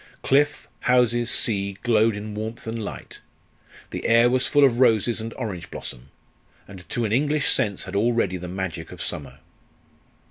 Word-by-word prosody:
Cliff, 145 +2 +2 0.2
houses, 120 -1 +3
sea, 100 -3 +1
glowed 110 -2 +3
in 105 +1 -6
warmth 110 +2 -6
and 115 0 -4
light; - - -8 0.7
the - - -3
air 115 +1 +5
was 130 +1 +2
full 145 -1 +4
of 125 -3 +4
roses 115 -2 +3
and 115 +1 -5
orange 100 -9 -5
blossom; - - -8 0.6
and 95 -2 -12
to 120 - -1
an 105 - -2
English 145 +4 +2
sense 100 -3 0
had - - -7
already 110 -3 +1
the 90 0 -7
magic 90 -3 -5
of - - -10
summer. - - -4
115 Hz, 165 wpm, -24 LUFS, 100-120 Hz, 0.7 s, air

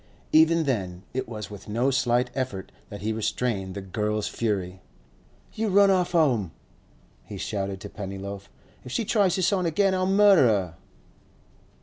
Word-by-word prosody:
Even 160 +1 +5
then 95 - -2
it 130 -2 -3
was 105 -3 -7
with 100 -2 -10
no 120 +6 +1
slight 125 -1 +1
effort 125 -8 -4 0.2
that 105 0 -8
he 110 +1 -1
restrained 110 -3 -2
the 100 - -4
girl's 105 +2 -2
fury. 95 -5 -3 0.7
'You 220 +1 -2
run 200 0 +5
off 180 -2 +1
'ome!' 125 - +2 0.7
he - - -9
shouted 100 -2 -3
to - - -6
Pennyloaf. 100 0 -7 0.3
'If 125 - -9
she 225 - -1
tries 200 -4 +2
this 185 +1 +1
on 185 -3 +1
again, 195 +4 +2
I'll 185 0 0
murder 195 -7 +6
her! 95 -7 0
120 Hz, 155 wpm, -25 LUFS, -, 0.7 s, murder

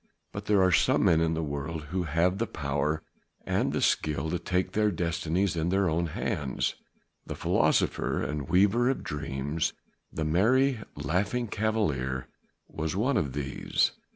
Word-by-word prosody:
But 100 0 -6
there 100 -2 +4
are 95 - +4
some 80 - +3
men 80 -1 +4
in 80 0 +1
the 80 - -1
world 75 +2 -4
who 90 -1 -1
have 85 +5 +1
the 115 - 0
power 75 -3 -1 0.4
and - - +1
the - - -1
skill 75 0 +1
to 90 - -1
take 90 +2 -1
their 105 0 +2
destinies 85 +1 0
in 80 +1 0
their 95 0 +2
own 85 +1 0
hands. 70 -3 -2 0.5
The - - -4
philosopher - - +1
and 75 +1 -3
weaver 100 +8 +4
of 135 - -1
dreams, 75 0 -2 0.4
the 80 - -3
merry 120 - +3 0.2
Laughing 100 +11 -1
Cavalier 75 - -1 0.4
was 80 +1 -3
one 125 +7 +1
of 70 - 0
these. 70 -1 0
85 Hz, 155 wpm, -28 LUFS, 75-100 Hz, 0.5 s, there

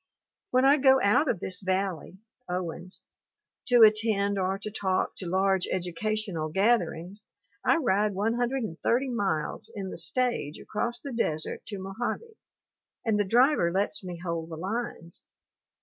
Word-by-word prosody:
When 255 +1 +3
I 280 +2 +6
go 265 -1 +5
out 210 +9 +4
of 200 - 0
this 185 -1 -3
valley 185 -1 -2 0.3
(Owens) 180 0 -5 0.6
to 245 -3 +7
attend 210 -2 +3
or 190 +1 0
to 210 +1 -7
talk 190 -3 -1
to 180 - -4
large 190 0 +2
educational 185 -1 -2
gatherings 195 0 0 0.4
I - - +4
ride 210 - +1
130 235 +2 0
miles 195 -10 -2
in 195 -2 -5
the - - -7
stage 170 - -1
across 235 +3 -3
the 280 - -5
desert 155 -9 -1
to 205 - -5
Mojave, 225 - -4 0.7
and 215 -2 +2
the - - +4
driver 240 - +3
lets 195 +2 0
me 180 -2 -6
hold 170 -1 -4
the 160 - -6
lines. 185 -2 -5
200 Hz, 140 wpm, -28 LUFS, 180-235 Hz, 0.7 s, to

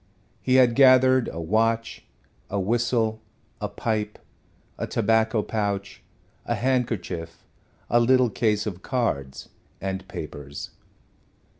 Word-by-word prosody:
He 130 - +2
had 125 -2 +6
gathered 130 -1 +5
a 85 - -6
watch, 115 +6 0 0.4
a 100 - -1
whistle, 110 +1 0 0.4
a - - -2
pipe, 105 -2 -2 0.6
a - - -2
tobacco 110 0 +2
pouch, 100 -2 -3 0.5
a - - 0
handkerchief, 110 -10 -2 0.4
a 120 - +3
little 125 0 +4
case 105 -2 +1
of 95 -4 -5
cards 70 - -2 0.3
and 95 0 -4
papers. 70 0 -7
110 Hz, 110 wpm, -25 LUFS, 100-120 Hz, 0.6 s, had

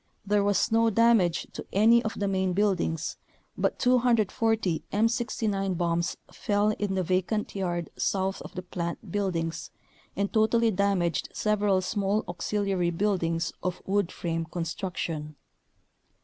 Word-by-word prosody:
There 205 0 +2
was 205 +3 +2
no 225 0 +4
damage 220 -6 +3
to - - -6
any 225 +4 +5
of 220 - -3
the 200 - 0
main 190 -1 0
buildings, 180 -5 0 0.4
but - - 0
240 225 -6 +2
M69 210 -4 0
bombs 170 0 0 0.2
fell 205 +1 +1
in 205 -2 -1
the 185 - +1
vacant 185 +4 -1
yard 175 -3 -2
south 190 0 0
of - - -10
the 180 - -4
plant 170 +1 -5
buildings 170 -5 -2 0.5
and 200 +1 -1
totally 225 +1 +3
damaged 190 -4 0
several 205 -3 +1
small 200 +2 0
auxiliary 195 -4 -1
buildings 170 -2 0
of 180 -1 -2
wood 200 -2 +1
frame 165 -1 -2
con 165 +1 -4
struction. 160 -3 -4
195 Hz, 135 wpm, -27 LUFS, 175-210 Hz, 0.5 s, any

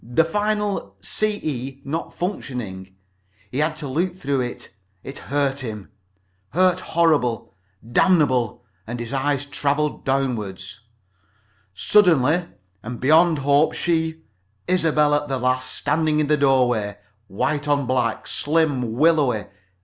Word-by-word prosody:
The 125 +8 +2
final 205 - -1
—CE 140 - -2
not 160 +4 -4
functioning. 110 - -5 0.6
He 130 - -2
had 155 +1 +1
to 150 -2 -5
look 170 +7 -1
though 140 -3 -1
it 125 -1 -5 0.6
hurt 140 -1 0
him. 110 -6 -7 0.6
Hurt 185 +1 +3
horrible. 150 - +1 0.3
Damnably. 130 - +3 0.3
And 120 +2 -5
his 120 +2 -6
eyes 140 +1 0
traveled 145 +1 -1
downward. 120 -8 -1 1.1
"Suddenly 170 - +3 0.3
and 120 +3 -7
beyond 160 +4 +4
hope 140 +2 +3
she! 160 -1 -1 0.4
Isobel 155 -5 +2
at 145 0 +1
the 135 -2 -1
last. 130 0 0
Standing 155 0 0
in 155 - +2
the 150 +1 +3
doorway. 125 -7 +2 0.3
White 145 +9 -2
on 145 -2 +1
black. 125 -2 -1
Slim. 145 -6 0
Willowy. 140 -5 +2
140 Hz, 120 wpm, -22 LUFS, 125-160 Hz, 1.1 s, beyond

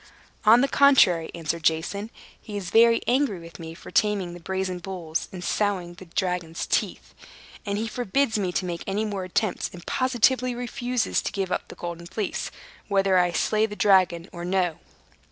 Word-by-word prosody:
"On 230 +3 +7
the 275 - +3
contrary," 225 -14 +5
answered 165 0 -3
Jason, 165 +7 0 0.3
"he 210 -2 -6
is 190 -3 -5
very 230 0 +5
angry 245 -6 +1
with 165 +1 -12
me 165 0 -8
for - - -12
taming 200 -4 +1
the 175 - -9
brazen 190 +1 -3
bulls 175 -3 -4
and 180 -2 -7
sowing 190 -3 -1
the 180 +2 -12
dragon's 175 -1 -2
teeth. - - -2 0.5
And 200 0 -1
he 225 +2 -2
forbids 240 0 0
me 185 -3 -1
to 185 - -1
make 170 -1 -4
any 205 +3 0
more 200 -3 -3
attempts, 185 +2 -1
and 175 -2 -11
positively 255 0 +2
refuses 245 0 -1
to - - -3
give 190 -2 -3
up - - -2
the - - -11
Golden 170 0 -6
Fleece, 195 +2 -3 0.4
whether 195 -2 +3
I 180 -1 +2
slay 215 +5 +1
the 210 - -7
dragon 185 -4 +3
or 175 -1 -6
no." 180 -2 0
190 Hz, 180 wpm, -25 LUFS, 175-220 Hz, 0.5 s, On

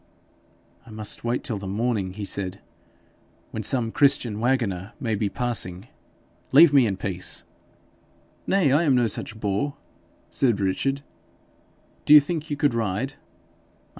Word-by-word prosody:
'I 110 - -11
must 110 -1 -3
wait 120 +1 -1
till 115 -8 -2
the 100 - -7
morning,' 100 -2 -1
he 100 +1 -6
said, 95 0 -3 0.9
'when - - -4
some 120 -4 +1
Christian 130 -7 +2
waggoner 110 -6 -1
may 115 -6 -2
be 105 -1 0
passing. 105 -4 -3 0.6
Leave 165 -3 +7
me 135 -4 +5
in 95 -2 -2
peace.' 95 -2 -3 1.0
'Nay, 185 -8 +3
I 145 +4 +4
am 145 -6 +3
no 125 -1 +3
such 110 0 -4
boor!' 105 +7 -2 0.5
said 120 -7 +2
Richard. 135 +9 -1 1.0
'Do 150 - +8
you - - +12
think 155 +1 -4
you 145 - -2
could 145 -3 +2
ride?' 115 +3 -2
115 Hz, 140 wpm, -24 LUFS, 100-135 Hz, 1.0 s, you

